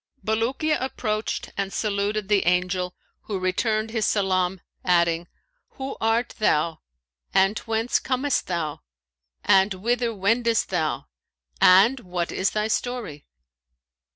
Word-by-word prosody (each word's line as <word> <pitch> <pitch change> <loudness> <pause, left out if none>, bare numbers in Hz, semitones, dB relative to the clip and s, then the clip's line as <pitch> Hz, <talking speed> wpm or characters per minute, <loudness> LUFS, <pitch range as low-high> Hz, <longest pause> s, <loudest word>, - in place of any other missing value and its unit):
Bulukiya 245 +8 0
approached 215 -4 -3
and 195 -1 -2
saluted 205 0 -1
the 200 -3 +2
Angel, 180 0 +1 0.3
who 205 - -3
returned 215 +4 0
his 220 -2 0
salam 190 -2 +1 0.2
adding, 170 -1 +2 0.5
'Who 270 0 -5
art 225 +2 +1
thou 160 -5 +1 0.6
and 195 +2 +3
whence 225 +1 0
comest 265 +2 -1
thou 165 -5 -3 0.6
and 190 +1 +4
whither 235 +4 0
wendest 225 +3 +1
thou 155 -9 -1 0.6
and 200 +9 +6
what 180 -5 -3
is 190 - +1
thy 215 0 -1
story?' 220 - -3
205 Hz, 115 wpm, -24 LUFS, 180-225 Hz, 0.6 s, and